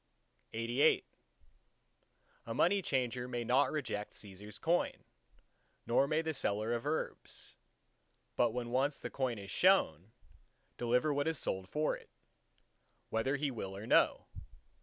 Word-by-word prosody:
LXXXIX 120 +7 +3 1.4
A 115 - -3
money 195 +3 +3
changer 125 -5 -1
may 120 -1 -2
not 130 +4 +3
reject 125 -9 -3
Cæsar's 105 +1 -8
coin, 170 +2 0 0.8
nor 130 +4 +3
may 155 +2 +1
the 160 0 -1
seller 110 -3 0
of 120 +4 -2
herbs, 155 +1 -4 0.8
but 120 - +4
must 115 - -5
when 120 -1 -3
once 135 +3 +1
the - - -6
coin 130 -4 -1
is 100 -1 -8
shown, 110 - +3 0.7
deliver 125 +5 +2
what 145 +2 0
is 160 -1 0
sold 95 -6 -2
for 150 +6 0
it, - - -14 1.0
whether 115 +5 +1
he 145 0 -1
will 95 -5 -5
or 105 - -7
no. - - +4
125 Hz, 140 wpm, -34 LUFS, 110-145 Hz, 1.4 s, but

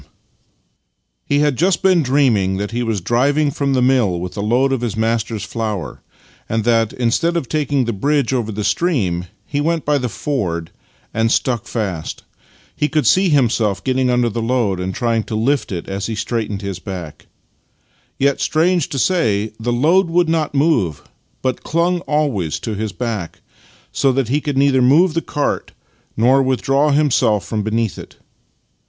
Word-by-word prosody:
62 - - -24
Master - - -40
and - - -46
Man 145 - +3
He 145 - +3
had 145 -4 0
just 180 +2 +2
been 185 -3 +4
dreaming 125 -9 +2
that 105 +2 -3
he 120 +1 -2
was 115 -5 -1
driving 140 - +1
from 140 -1 -1
the 130 -1 +2
mill 120 -9 +2
with 90 0 -6
a 100 - -3
load 125 +6 +2
of 130 - -1
his 115 -3 -3
master's 115 -1 -1
flour, 105 -8 -4 0.5
and 110 0 0
that, 115 -1 +2
instead 145 +8 +1
of 140 - -3
taking 145 -3 0
the 115 - -2
bridge 140 +4 0
over 115 -4 -1
the 105 0 -4
stream, 105 - 0 0.2
he 145 +1 -2
went 165 +1 0
by 145 -1 +2
the 125 -1 -2
ford, 90 - -3 0.4
and 115 +1 +1
stuck 120 -5 0
fast. 95 -9 -4 0.5
He 150 - 0
could 155 -2 0
see 190 0 +4
himself 115 - +1
getting 130 -1 +1
under 125 -1 +2
the 115 +1 -3
load 115 -5 0
and 90 +1 -2
trying 115 -2 0
to 110 - -4
lift 130 +5 0
it 85 -3 -5
as 95 0 -3
he 115 - -3
straightened 110 -2 -3
his 100 -2 -4
back. 90 -6 -8 0.9
Yet, 140 +1 +1
strange 170 0 +1
to 140 - -4
say, 110 - +1
the 120 +2 -1
load 165 +10 +3
would 175 0 +2
not 160 -3 0
move, 125 - +1 0.4
but 130 -1 -1
clung 170 +2 +1
always 135 - 0
to 110 - -3
his 105 0 -3
back, 105 -3 -4 0.5
so 135 - +2
that 130 -3 0
he 145 +4 +1
could 145 -2 -3
neither 135 -1 +3
move 155 +8 +4
the 165 - 0
cart 145 -2 -2 0.4
nor 130 +5 +4
withdraw 135 +2 +1
himself 130 -8 +2
from 110 -2 -2
beneath 110 0 -1
it. - - -11
120 Hz, 185 wpm, -18 LUFS, 105-145 Hz, 0.9 s, been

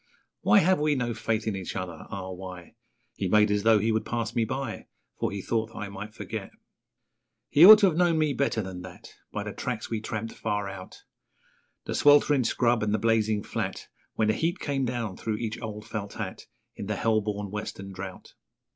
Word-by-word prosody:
Why 105 - +4
have 185 +1 +4
we 150 0 +2
no 120 -3 -1
faith 110 0 -1
in 110 -3 -1
each 95 -2 -5
other? 90 -4 -5
Ah, 95 -3 -5
why? 90 -2 -9 0.4
He 95 - -2
made 105 +2 +4
as 105 0 +2
though 110 +1 +5
he 110 +2 +1
would 110 0 0
pass 115 -2 -3
me 115 -2 +1
by, 130 0 -4 0.3
For - - 0
he 100 -1 -5
thought 110 -1 0
that - - -11
I 100 -2 -4
might 100 +2 -8
forget. - - -6 1.0
He 150 - +6
ought 215 +1 +13
to - - +7
have 170 -4 +2
known 175 -2 +3
me 155 -2 +2
better 120 -4 0
than 95 -1 -7
that, 90 -1 -11 0.2
By 105 - -3
the 105 0 -6
tracks 120 -5 -4
we 110 -2 -1
tramped 110 +1 -4
far 105 -1 -2
out 95 -1 -9 0.8
The - - -3
sweltering 145 -2 +5
scrub 120 0 +2
and 105 0 +1
the - - +2
blazing 110 -2 +1
flat, - - -4 0.3
When 110 -1 +2
the - - +4
heat 170 - 0
came 140 -5 -1
down 120 -6 -3
through 110 -1 -2
each 110 -1 -4
old 105 -1 -6
felt 100 -1 -5
hat - - -6 0.3
In 100 - -6
the 105 - -1
hell 110 0 +2
born 105 -1 -4
western 100 -2 -6
drought. 95 0 -8
110 Hz, 210 wpm, -27 LUFS, 100-120 Hz, 1.0 s, ought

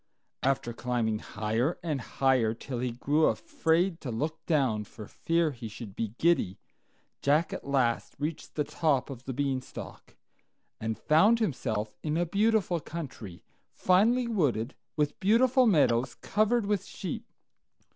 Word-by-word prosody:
After 130 -3 0
climbing 115 -3 -1
higher 110 +11 -1
and 150 -6 -1
higher, 125 -3 +1
till 125 +1 -5
he 125 +1 -1
grew 145 +6 +1
afraid 180 - +1
to 135 - -5
look 150 +8 -3
down 130 -10 +2
for 105 +1 -11
fear 165 -1 0
he 120 -4 -7
should 110 -2 -9
be 110 -1 -3
giddy, 170 - +2 0.6
Jack 150 +4 +2
at - - -6
last 130 -4 0
reached 150 +2 -4
the 150 - +1
top 145 -3 0
of 130 -1 -9
the 135 - -3
Beanstalk, 135 -1 -4 0.6
and 110 0 -2
found 200 +10 +4
himself 110 - -2
in 155 0 -1
a 175 - +2
beautiful 200 -1 +2
country, 135 - -8 0.3
finely 230 +7 +3
wooded, 140 - 0 0.2
with 150 -1 0
beautiful 245 +5 +4
meadows 130 - +3
covered 215 +2 +1
with 205 -2 0
sheep. 225 +5 -6
145 Hz, 140 wpm, -29 LUFS, 120-175 Hz, 0.6 s, found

